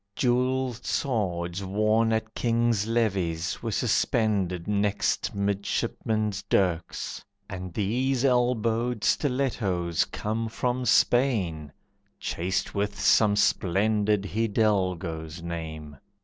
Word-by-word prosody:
Jewelled 125 -1 0
swords 95 -7 -1
worn 110 +3 +2
at 110 0 -1
kings' 115 -3 +1
levees 95 -8 -1
Were 115 - -3
suspended 105 -5 0
next 105 0 0
midshipmen's 100 +1 -1
dirks, 90 -4 -1 0.2
and 90 -2 -6
these 125 +7 0
Elbowed 120 -2 +1
stilettos 110 - 0
come 110 +2 -3
from 125 +2 -2
Spain, 100 - +2 0.5
Chased 90 +2 -2
with 100 0 -2
some 105 -2 +4
splendid 105 +1 +2
Hidalgo's 95 -7 -1
name. 80 -3 -6
105 Hz, 90 wpm, -26 LUFS, 90-115 Hz, 0.5 s, some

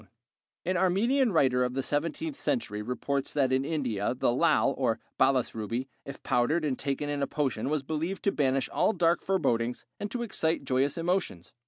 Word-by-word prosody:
] - - -66
An 185 +1 +1
Armenian 220 +8 +2
writer 130 -7 +3
of 125 0 -2
the 135 - -1
seventeenth 170 - -2
century 225 - -2
reports 135 +4 -2
that 135 -3 +2
in 130 +1 +2
India 125 -8 -1
the - - +2
lâl 120 - +3
or - - 0 0.2
balas 130 -2 +3
ruby, 115 +4 -3 0.2
if 140 - -9
powdered 150 +7 +1
and 135 -4 -1
taken 140 +1 -2
in 145 -1 -2
a 140 - +1
potion 135 -5 -1
was 150 -2 0
believed 160 +6 -3
to 200 - +3
banish 135 -4 +1
all 220 - +2
dark 170 -3 +2
forebodings 120 -11 0
and 205 - -3
to 240 +1 -3
excite 160 -9 -1
joyous 135 +3 +1
emotions. 170 - -2
145 Hz, 185 wpm, -29 LUFS, 130-175 Hz, 0.2 s, writer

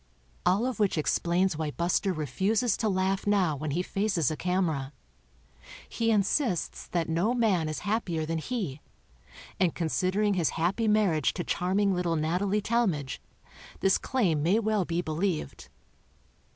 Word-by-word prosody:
All 195 +6 +3
of 255 -2 -3
which 205 -5 +2
explains 175 +3 +1
why 155 -2 -1
Buster 175 +5 0
refuses 190 - 0
to 220 - 0
laugh 190 +1 0
now 190 -7 +2
when 150 +2 -4
he 170 +6 -1
faces 195 - 0
a - - -2
camera. 160 -6 -1 0.9
He 230 -1 -1
insists 210 - 0
that 170 -2 -1
no 175 +9 +1
man 195 -10 +2
is 155 - -4
hap 220 +3 -1
pier 160 -3 -2
than 165 +1 -2
he, 170 - -4 0.8
and 180 -3 +2
considering 185 +5 +1
his 175 -5 +1
happy 190 +7 +1
marriage 200 -9 +2
to 175 - -2
charming 195 +4 +1
little 175 -2 0
Natalie 180 +7 0
Tal 235 +2 +2
madge, 145 -7 -3 0.6
this 195 - +3
claim 190 - 0
may 175 +8 +3
well 215 -4 +1
be 170 +1 -1
believed. 165 +1 -3
185 Hz, 150 wpm, -28 LUFS, 160-205 Hz, 0.9 s, All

